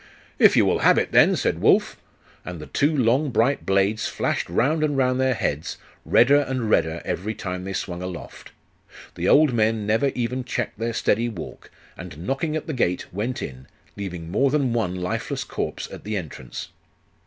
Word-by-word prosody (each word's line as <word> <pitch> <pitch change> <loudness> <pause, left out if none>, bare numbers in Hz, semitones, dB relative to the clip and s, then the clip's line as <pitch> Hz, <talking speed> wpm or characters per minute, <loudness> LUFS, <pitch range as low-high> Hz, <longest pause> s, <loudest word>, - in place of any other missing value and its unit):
'If - - +6
you - - +5
will - - +2
have - - +5
it, - - 0
then!' - - +5
said - - -1
Wulf. - - +3 0.5
And 90 -2 -7
the 75 - -8
two 145 - +1
long 130 +4 +2
bright 120 +4 +1
blades 100 +3 +2
flashed - - -2
round 145 - +1
and 145 -2 0
round 130 -1 +2
their 130 -1 +2
heads, 75 -6 -2 0.3
redder 140 +4 +5
and 130 -5 -2
redder 80 +1 +1
every 110 +5 -3
time 90 -1 -5
they 95 - -4
swung 90 -2 -4
aloft.... 90 -1 -8 0.6
The - - -1
old 150 -3 +5
men 110 -1 +1
never 110 +7 +2
even 125 +1 -2
checked 120 - -4
their 115 +1 -2
steady 115 +2 +1
walk, 95 -8 -9 0.3
and 85 -3 -9
knocking 150 +5 -1
at 155 - -3
the 155 - -4
gate, 90 -11 -1
went 115 +6 -3
in, 65 -1 -8 0.3
leaving 90 -4 -6
more 135 +8 +3
than 135 -4 +1
one 105 -6 -1
lifeless 90 0 -3
corpse - - -4
at - - -9
the 105 0 -3
entrance. 75 -8 -7
110 Hz, 185 wpm, -23 LUFS, 90-130 Hz, 0.6 s, If